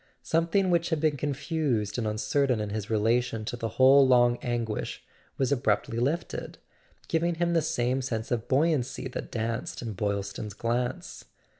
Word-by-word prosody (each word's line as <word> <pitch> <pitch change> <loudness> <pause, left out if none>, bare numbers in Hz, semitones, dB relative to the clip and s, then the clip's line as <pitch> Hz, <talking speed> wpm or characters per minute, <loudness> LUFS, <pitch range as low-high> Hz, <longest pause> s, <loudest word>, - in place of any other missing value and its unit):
Something 170 +3 +1
which 170 0 +2
had 160 -3 0
been 155 -1 +2
confused 135 -6 -1
and 110 - -1
uncertain 110 +4 +1
in 105 -1 -3
his 105 0 -4
relation 115 +1 +1
to 120 - -3
the 115 -1 -3
whole 135 +1 +7
long 120 -1 +4
anguish 120 -3 -3 0.3
was 135 0 0
abruptly 115 -3 +1
lifted, 145 +7 -2 0.5
giving 170 +1 +1
him 170 +1 0
the 165 - +3
same 125 -1 0
sense 115 -2 -3
of 120 -2 -1
buoyancy 140 -2 +1
that - - -6
danced 115 +1 -3
in 115 -2 -4
Boylston's 100 0 -3
glance. 120 +2 -3
125 Hz, 155 wpm, -28 LUFS, 110-145 Hz, 0.5 s, whole